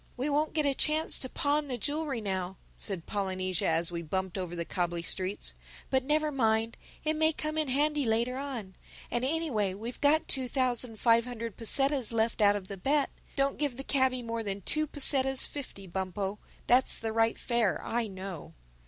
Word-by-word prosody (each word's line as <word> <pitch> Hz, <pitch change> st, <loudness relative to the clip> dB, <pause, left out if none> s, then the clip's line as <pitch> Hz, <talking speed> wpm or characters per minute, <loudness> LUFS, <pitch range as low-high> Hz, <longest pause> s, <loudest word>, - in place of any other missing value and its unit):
"We 275 Hz, +4 st, -1 dB
won't 300 Hz, +2 st, +1 dB
get 305 Hz, -2 st, +1 dB
a 280 Hz, -, +3 dB
chance 310 Hz, +3 st, +4 dB
to 260 Hz, -, -2 dB
pawn 295 Hz, 0 st, 0 dB
the 255 Hz, -2 st, -3 dB
jewelry 290 Hz, -1 st, -2 dB
now," 190 Hz, -2 st, -2 dB, 0.2 s
said 190 Hz, -5 st, -3 dB
Polynesia, 185 Hz, -3 st, -1 dB
as 165 Hz, +1 st, +3 dB
we 170 Hz, -1 st, -3 dB
bumped 190 Hz, +3 st, -3 dB
over 180 Hz, -3 st, -4 dB
the 170 Hz, -1 st, -3 dB
cobbly 175 Hz, -1 st, -2 dB
streets. 185 Hz, +3 st, -2 dB, 0.4 s
"But 265 Hz, -1 st, +3 dB
never 305 Hz, +2 st, +1 dB
mind—it 225 Hz, +4 st, 0 dB
may 315 Hz, +1 st, +3 dB
come 305 Hz, 0 st, -3 dB
in 310 Hz, -1 st, +1 dB
handy 295 Hz, +3 st, +2 dB
later 235 Hz, +2 st, +1 dB
on. 245 Hz, -9 st, -5 dB, 0.4 s
And 240 Hz, -, 0 dB
anyway 260 Hz, -, 0 dB
we've 230 Hz, +5 st, -7 dB
got 310 Hz, +3 st, +4 dB
two 260 Hz, -1 st, +1 dB
thousand 245 Hz, -3 st, 0 dB
five 230 Hz, -1 st, +4 dB
hundred 230 Hz, -4 st, -5 dB
pesetas 270 Hz, +2 st, +2 dB
left 225 Hz, 0 st, +1 dB
out 205 Hz, 0 st, +6 dB
of 195 Hz, -2 st, -5 dB
the 200 Hz, -, -6 dB
bet. 280 Hz, +9 st, +1 dB, 0.2 s
Don't 275 Hz, 0 st, +1 dB
give 285 Hz, -5 st, -1 dB
the 270 Hz, -, -4 dB
cabby 260 Hz, -3 st, +2 dB
more 230 Hz, 0 st, -2 dB
than 200 Hz, -2 st, -4 dB
two 310 Hz, -, +2 dB
pesetas 270 Hz, -2 st, +1 dB
fifty, 260 Hz, -9 st, -8 dB
Bumpo. 190 Hz, +2 st, -3 dB, 0.3 s
That's 250 Hz, +1 st, +4 dB
the 225 Hz, -1 st, -3 dB
right 225 Hz, 0 st, +2 dB
fare, 235 Hz, -6 st, +1 dB
I 235 Hz, 0 st, -1 dB
know." 190 Hz, -4 st, -8 dB
235 Hz, 185 wpm, -30 LUFS, 195-280 Hz, 0.4 s, out